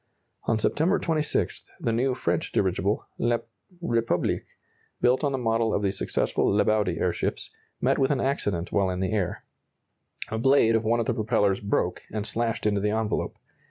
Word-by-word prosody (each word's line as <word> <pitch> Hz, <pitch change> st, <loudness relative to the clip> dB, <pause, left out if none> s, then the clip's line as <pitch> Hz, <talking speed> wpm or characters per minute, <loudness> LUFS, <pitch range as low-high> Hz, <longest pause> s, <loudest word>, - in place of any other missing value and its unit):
On 115 Hz, -, +2 dB
September 160 Hz, -, +2 dB
26, 155 Hz, -3 st, -1 dB, 0.2 s
the 115 Hz, -, 0 dB
new 125 Hz, +3 st, +1 dB
French -, -, -1 dB
dirigible, 95 Hz, +2 st, 0 dB
"La 120 Hz, 0 st, +2 dB, 0.4 s
Republique," 115 Hz, -, 0 dB, 0.5 s
built 125 Hz, +4 st, +3 dB
on 145 Hz, -, +2 dB
the 135 Hz, -, -1 dB
model 115 Hz, -2 st, +1 dB
of 105 Hz, -, -1 dB
the 100 Hz, -, +2 dB
successful 95 Hz, -, 0 dB
Lebaudy 105 Hz, -3 st, +2 dB
airships, -, -, -2 dB, 0.3 s
met -, -, +2 dB
with 135 Hz, -, +3 dB
an 140 Hz, -3 st, +1 dB
accident 100 Hz, -10 st, -1 dB
while 100 Hz, -2 st, +2 dB
in 90 Hz, 0 st, -2 dB
the 95 Hz, +1 st, -1 dB
air. 95 Hz, -5 st, -2 dB, 0.8 s
A 110 Hz, -, -2 dB
blade 120 Hz, -2 st, +4 dB
of 115 Hz, -, +1 dB
one 115 Hz, +2 st, +2 dB
of 115 Hz, -, 0 dB
the 125 Hz, -, +1 dB
propellers 105 Hz, -3 st, +1 dB
broke 100 Hz, 0 st, -1 dB
and 105 Hz, -1 st, -3 dB
slashed 115 Hz, 0 st, -1 dB
into 105 Hz, -2 st, +2 dB
the 105 Hz, -, +1 dB
envelope. 110 Hz, 0 st, -1 dB
110 Hz, 170 wpm, -26 LUFS, 100-120 Hz, 0.8 s, blade